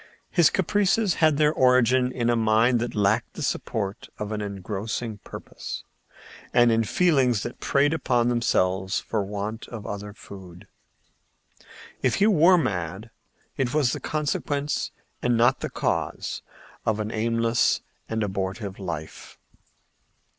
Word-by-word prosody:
His 170 -4 +5
caprices 200 +1 +2
had 155 -2 +4
their 150 0 +3
origin 125 -1 +4
in 120 -2 0
a - - +2
mind 115 +2 +3
that 120 +1 -3
lacked 105 +3 +1
the 160 - -6
support 105 -6 -3
of 105 0 -4
an 105 -1 -2
engrossing 105 +2 -4
purpose, - - -8 0.7
and 120 -1 +5
in 115 0 +3
feelings 130 - +2
that - - -6
preyed 145 +2 +2
upon 125 -6 +1
themselves 95 -6 +1
for 110 -3 -2
want 105 +3 -5
of 110 -4 -8
other 100 0 -5
food. 95 -4 -12 1.3
If - - +2
he 200 - +3
were 185 -3 +6
mad, 95 - -3 0.5
it 130 0 -1
was 140 -5 +3
the - - -3
consequence, 145 -1 -2 0.3
and 120 -1 +2
not 120 +1 +4
the - - -4
cause, - - -2 0.4
of 110 -1 0
an 105 0 -3
aimless 115 +1 +1 0.3
and 110 -1 -1
abortive 95 0 -3
life. 85 -5 -7
115 Hz, 135 wpm, -25 LUFS, 105-135 Hz, 1.3 s, were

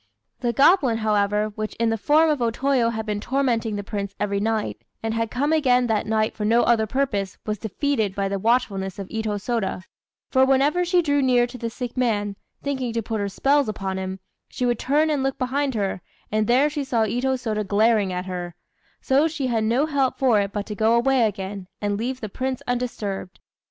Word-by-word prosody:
The 240 -2 0
goblin, 275 - +4
however, 210 -1 +1
which 215 0 -5
in 230 0 +1
the - - +1
form 305 +8 +4
of 290 -4 -1
O 235 - +2
Toyo 255 0 +1
had 220 -1 -3
been 210 -1 -2
tormenting 235 -3 0
the 205 - -4
Prince 200 -1 -4
every 200 -1 0
night, 220 +1 -1 0.2
and 225 0 -1
had 230 0 -1
come 285 +7 0
again 250 -5 +3
that 220 -3 0
night 215 0 +1
for 210 - -5
no 230 +3 +4
other 225 -2 +3
purpose, 205 -7 -1
was 215 -1 -2
defeated 220 -2 -1
by 200 -1 0
the 195 0 -2
watchfulness 200 -4 0
of 195 -2 -6
Itô 220 -2 -2
Sôda; 210 -4 -2 0.5
for 260 -1 +5
whenever 275 +6 +3
she 355 0 +2
drew 285 -2 +2
near 250 -2 +4
to 245 +1 -10
the 230 - -3
sick 245 +1 -6
man, 210 -5 0 0.3
thinking 265 -4 -2
to 230 0 -1
put 220 0 -3
her 200 0 -1
spells 275 +5 +2
upon 190 -2 -3
him, 190 0 -5 0.3
she 250 - -2
would 240 -2 +1
turn 300 +4 +2
and 290 -3 0
look 270 0 -1
behind 265 +1 -1
her, 195 -3 -1 0.3
and 215 0 +1
there 260 +5 +4
she 295 -1 -3
saw 240 -4 +1
Itô 245 +5 0
Sôda 220 -4 -2
glaring 210 0 +2
at 180 0 -3
her; 180 -2 -5 0.5
so 280 +3 +3
she 300 -4 -3
had 230 -3 0
no 240 +7 +2
help 280 -4 0
for 245 -6 +3
it 200 0 -3
but 205 -1 -3
to 210 - -5
go 220 +3 +3
away 245 -1 +3
again, 195 -2 -6
and 205 -1 -1
leave 250 +5 -3
the 215 - -3
Prince 260 +5 -3
undisturbed. 230 -7 -3
230 Hz, 215 wpm, -23 LUFS, 205-265 Hz, 0.5 s, for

